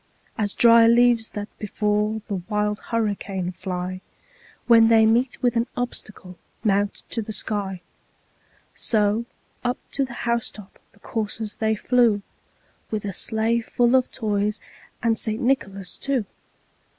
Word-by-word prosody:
As 205 -3 -2
dry 230 -1 +7
leaves 235 -1 +4
that 205 0 -5
before 210 +1 0
the 200 - -3
wild 210 -1 0
hurricane 200 -5 -1
fly, 185 0 -4 0.6
When 230 -1 +7
they 225 -1 +6
meet 240 +3 +2
with 245 -1 +2
an 230 +1 +1
obstacle, 215 -7 -5 0.2
mount 205 -1 +1
to 230 - -1
the 220 - -6
sky; 200 -3 -3 0.9
So 215 +1 +1 0.4
up 245 +1 0
to 275 - 0
the 255 -2 -5
housetop 235 -4 -3
the - - -23
coursers 220 -1 -4
they 220 0 +1
flew, 230 -3 +2 0.7
With 215 -2 -3
the 200 -1 -4
sleigh 225 +4 0
full 240 +2 +2
of 255 -1 +2
toys, 210 -2 -1 0.4
and 225 -1 +2
St. 220 0 -2
Nicholas, 200 -8 -1
too. 270 -6 -1
220 Hz, 135 wpm, -24 LUFS, 205-235 Hz, 0.9 s, dry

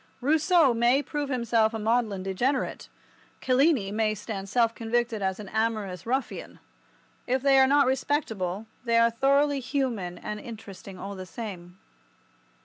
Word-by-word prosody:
Rousseau 310 +1 +4
may 240 +4 +3
prove 290 -2 -3
himself 230 -3 +1
a - - -1
maudlin 220 -3 0
degenerate. 245 +8 -1 0.5
Cellini 255 -5 +2
may 215 0 0
stand 200 -2 -6
self 230 +1 +2
convicted 230 -1 -1
as 190 0 -1
an 210 - -8
amorous 215 -3 -2
ruffian. 260 +3 -3 0.7
If 260 +1 0
they 275 -1 +5
are 265 - +6
not 285 +1 +4
respectable 225 - -1 0.2
they 230 -1 +2
are 230 0 +5
thoroughly 280 +4 +2
human 245 -9 -2
and 210 +4 -6
interesting 200 -4 -10
all 195 +2 -6
the 185 -1 -8
same. 180 -5 -8
230 Hz, 140 wpm, -27 LUFS, 205-265 Hz, 0.7 s, are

